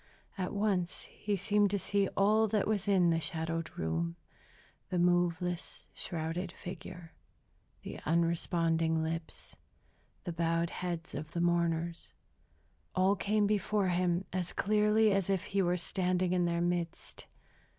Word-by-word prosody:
At 185 -3 -3
once 200 -4 0
he 205 -1 -3
seemed 205 +1 +2
to 200 - 0
see 200 0 +1
all 215 +3 +4
that 210 -1 +1
was 210 -2 0
in 185 -4 +4
the 165 - +2
shadowed 165 0 -1
room. 80 +1 -1 0.7
The 180 - -1
moveless, 175 0 0
shrouded 170 +1 -4
figure, 175 -2 -9 0.7
the - - -7
unresponding 165 0 +1
lips, 160 0 -5 0.7
the 175 - -4
bowed 165 0 0
heads 175 -2 -4
of 155 +1 -6
the 170 - -2
mourners, 170 -1 0 0.8
all 190 +2 +4
came 210 +1 +1
before 205 -1 +1
him 180 +1 +1
as 180 -2 -2
clearly 210 +1 +3
as 195 -1 +1
if 190 -1 +1
he 200 0 0
were 180 -1 +2
standing 180 0 0
in 180 -1 +2
their 170 0 0
midst. 175 -1 -3
175 Hz, 135 wpm, -32 LUFS, 165-195 Hz, 0.8 s, all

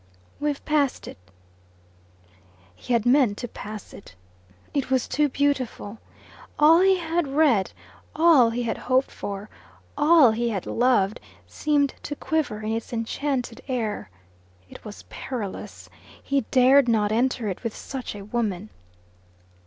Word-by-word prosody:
"We've 295 -1 -2
passed 295 -4 0
it." - - -10 1.6
He 245 - -4
had 230 -1 +2
meant 245 -5 +3
to 245 - -5
pass 215 -1 -9
it. 200 - -13 0.6
It 280 -3 -1
was 260 -2 +1
too 295 +1 +1
beautiful. 255 -6 -2 0.6
All 315 +3 +6
he 380 0 +4
had 335 -2 -1
read, 270 -8 +2 0.4
all 310 -7 +6
he 240 +2 -2
had 230 - -3
hoped 260 +1 +2
for, 200 +1 -6 0.5
all 295 -4 +6
he 235 +2 -1
had 195 -5 -3
loved, 240 -4 +1 0.3
seemed 290 -2 0
to 290 - -5
quiver 295 -9 -2
in 215 - -2
its 225 0 -4
enchanted 245 +1 -3
air. 225 - -3 0.6
It - - -13
was 210 -2 -10
perilous. 225 -7 -7 0.4
He 275 -4 0
dared 260 +1 +5
not 215 -3 +2
enter 240 0 0
it 190 +3 -5
with 230 -2 -4
such 260 -5 -6
a 200 -1 -9
woman. 215 -3 -3
250 Hz, 135 wpm, -24 LUFS, 220-285 Hz, 1.6 s, All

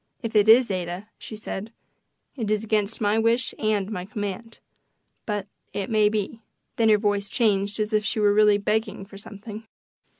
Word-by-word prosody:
"If 225 -1 -4
it 210 0 +5
is, 230 0 +6
Ada," 180 +2 -4
she 220 - -8
said, 215 0 -6 0.6
"it 225 -6 -3
is 215 0 +1
against 215 0 -1
my 210 +1 +2
wish 230 +2 +1
and 215 -2 0
my 180 -4 -4
command. 210 +2 -5 0.7
But 205 -3 -2 0.3
it 200 +2 -3
may 215 -1 +4
be." 215 +1 -3 0.4
Then 225 -1 +4
her 215 - +6
voice 205 -1 0
changed 205 -3 +1
as 215 +1 -1
if 215 0 +2
she 215 +1 -1
were 205 -1 +4
really 210 -1 +5
begging 210 -1 -1
for 195 0 -12
something. 210 +2 -10
210 Hz, 175 wpm, -25 LUFS, 205-220 Hz, 0.7 s, is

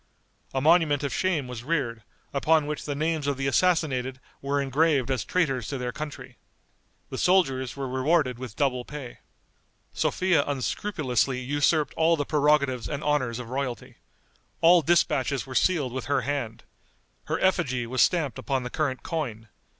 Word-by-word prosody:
A 135 - -1
monument 155 -2 +4
of 140 - -2
shame 170 -8 0
was 125 -2 -7
reared, 130 -7 -1 0.3
upon 155 +2 +3
which 150 0 -4
the 145 - -3
names 155 0 -1
of 140 -2 0
the 135 - -2
assassinated 135 -5 +1 0.2
were 140 +1 0
engraved 140 -1 +1
as 125 -6 0
traitors 135 - 0
to 140 - -3
their 125 -1 -3
country. 150 0 -8 0.7
The - - -4
soldiers 135 -9 +2
were 135 -1 -3
rewarded 130 0 +1
with 125 -4 -7
double 130 -4 0
pay. 140 -3 -9 0.7
Sophia 180 -5 +2
unscrupulously 135 - -1
usurped 145 +3 +1
all 165 +1 +3
the 145 - -1
prerogatives 140 -4 +2
and 145 -1 -4
honors 130 -6 0
of 125 -1 -7
royalty. 130 -3 -4 0.6
All 170 +1 +6
dispatches 145 -6 +1
were 130 - -8
sealed 145 -4 +1
with 130 - -4
her 140 0 +1
hand. 125 -4 -3 0.6
Her - - -2
effigy 135 -10 +1
was 130 +2 0
stamped 160 -7 +2
upon 135 -3 -1
the 125 - -6
current 140 -5 -2
coin. 115 -10 -4
140 Hz, 160 wpm, -26 LUFS, 130-155 Hz, 0.7 s, All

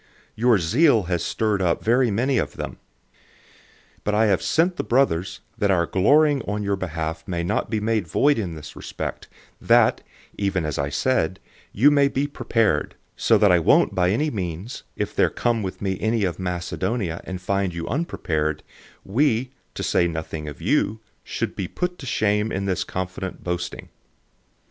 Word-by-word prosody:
Your 120 0 +3
zeal 115 - +3
has 85 -1 -1
stirred 105 -1 0
up 85 -2 +1
very 120 +2 +3
many 125 +5 +1
of - - -2
them. - - -6 1.2
009:003 - - -32
But 105 - 0
I 110 +1 +4
have 100 -4 +2
sent 175 +3 +1
the - - -1
brothers 115 -9 +1 0.2
that 100 - +2
our 85 -3 +3
boasting 145 - +3
on 105 +1 -2
your 100 0 0
behalf 80 -3 -4
may 85 -2 -2
not 100 +5 -1
be 110 - 0
in 105 - -3 0.2
vain 140 - +2
in 90 -6 -3
this 75 -1 -10
respect, - - -6 0.3
that, - - +4 0.3
just 100 -2 -1
as 75 -5 -1
I 70 0 0
said, 95 - 0 0.3
you 140 +8 +5
may 140 -1 +4
be 140 0 -1
prepared, 115 -6 0 0.2
009:004 - - -16
so 115 - +5
that 105 -2 +5
I 90 - +5
won't 80 - +4
by 90 -1 +2
any 145 +10 +1
means, 95 +2 -5
if - - -3
there - - +3
come 120 -2 0
with 95 0 -5
me 95 -1 -1
any 110 -1 +1
of 90 -2 -1
Macedonia 90 +1 -2
and 95 -1 -6
find 95 +1 -1
you 85 -1 -5
unprepared, 80 - -2 0.4
we 125 +2 +1 0.2
(to - - -4
say 85 - +2
nothing 80 -2 -5
of 75 -4 -8
you) 110 +2 +1 0.2
should - - -3
be 95 - -3
disappointed 110 - -1
in 95 +1 -2
this 95 -2 0
confident 95 0 -5
boasting. 90 -1 -4
100 Hz, 175 wpm, -23 LUFS, 90-115 Hz, 1.2 s, you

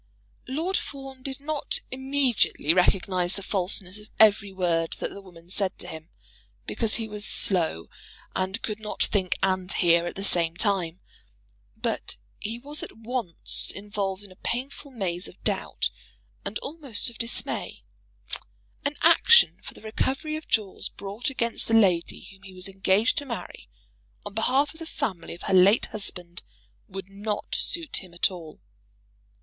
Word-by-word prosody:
Lord 325 +9 0
Fawn 270 -2 -7
did 265 0 -5
not 295 0 -1
immediately 265 - +2
recognise 180 0 +3
the 200 - -5
falseness 190 0 -1
of 210 0 -12
every 205 -2 +6
word 170 -3 0
that - - -4
the 200 - -9
woman 175 -3 -15
said 195 -2 0
to - - -4
him, 160 0 -8 0.6
because 225 -2 0
he 225 -2 -2
was 210 -1 -3
slow 165 - +2 0.5
and 190 +3 -1
could 215 -1 -3
not 215 -1 -1
think 190 -3 +1
and 185 0 +1
hear 170 -1 +3
at - - -5
the 195 - -4
same 170 -3 +2
time. 185 -5 0 0.8
But - - -2 0.2
he 225 +3 -3
was 290 +5 -4
at - - -7
once 225 -6 +3
involved 200 -1 -2
in 200 - -11
a - - -14
painful 270 +4 -3
maze 190 -8 -2
of - - -14
doubt - - 0 0.5
and - - -2
almost 275 -6 0
of 230 - -15
dismay. 230 0 -2 1.0
An 285 +1 0
action 470 +1 +7
for - - -9
the - - -14
recovery 270 +7 -1
of 310 - -7
jewels 210 -4 0
brought 205 +6 -4
against 235 -3 0
the 225 - +3
lady 185 -6 +3
whom 190 -1 -17
he 190 -1 -12
was 185 +2 -1
engaged 195 +3 +2
to 285 - -5
marry, 235 - -7 0.6
on - - -6
behalf 260 +7 +2
of 320 - -16
the 325 - -7
family 200 - -3
of 175 - -13
her 195 - -1
late 190 +4 +6
husband, 180 -4 -3 0.5
would 195 -1 -7
not 205 +1 -4
suit 335 -4 -1
him 180 -3 -8
at 175 - +3
all. 165 -4 -10
205 Hz, 160 wpm, -26 LUFS, 185-245 Hz, 1.0 s, action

